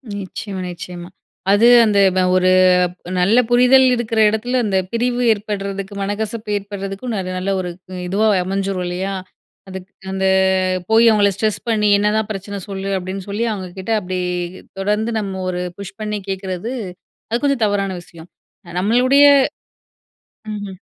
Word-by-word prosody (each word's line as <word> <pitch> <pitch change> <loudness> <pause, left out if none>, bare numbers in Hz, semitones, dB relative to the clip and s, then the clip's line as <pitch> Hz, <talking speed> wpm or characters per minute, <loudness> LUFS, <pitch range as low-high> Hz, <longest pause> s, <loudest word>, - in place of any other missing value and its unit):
நிச்சயமா, 195 0 -6
நிச்சயமா. 175 0 -8 0.4
அது 210 +4 +5 0.2
அந்தப 195 -3 +3
ஒரு 185 0 +3 0.7
நல்ல 200 +7 +3
புரிதல் 250 +2 +6
இருக்கிற 225 -2 -2
இடத்துல 245 +4 -1
அந்த 195 -2 +1
பிரிவு 245 +1 0
ஏற்படுறதுக்கு 200 -1 -5
மனக்கசப்பு 210 +2 -3
ஏற்படுறதுக்கும், 200 +3 -6 0.2
நல்ல 190 +2 -2
ஒரு 180 -1 -3 0.4
இதுவா 205 +4 +1 0.2
அமைஞ்சிறும் 195 -1 -2
இல்லையா? 185 +2 -3 0.6
அதுக்கு 190 0 -9 0.2
அந்த 190 0 -1 0.7
போய் 225 +1 +5
அவங்கள 205 -2 +4
ஸ்ட்ரெஸ் 215 -2 -1
பண்ணி 210 -2 +2
"என்னதான் 210 +1 +1
பிரச்சனை 200 0 -5
சொல்லு?" 195 0 -5
அப்படின்னு 185 +1 -5
சொல்லி 210 +4 -2
அவங்க 190 -3 -5
கிட்ட 190 +4 -6
அப்படி 185 -1 -4 0.6
தொடர்ந்து 210 +4 0
நம்ம 190 -2 -4
ஒரு 180 0 -3 0.2
புஷ் 195 -1 -8
பண்ணி 210 0 -2
கேட்கறது, 190 +3 -4 0.6
அது 235 - 0
கொஞ்சம் 275 -5 +2
தவறான 200 -2 -1
விஷயம். 170 -1 -14 0.5
நம்மளுடைய 255 +7 +4 1.3
ம்ஹ்ம். 205 -2 -7
200 Hz, 130 wpm, -19 LUFS, 190-220 Hz, 1.3 s, புரிதல்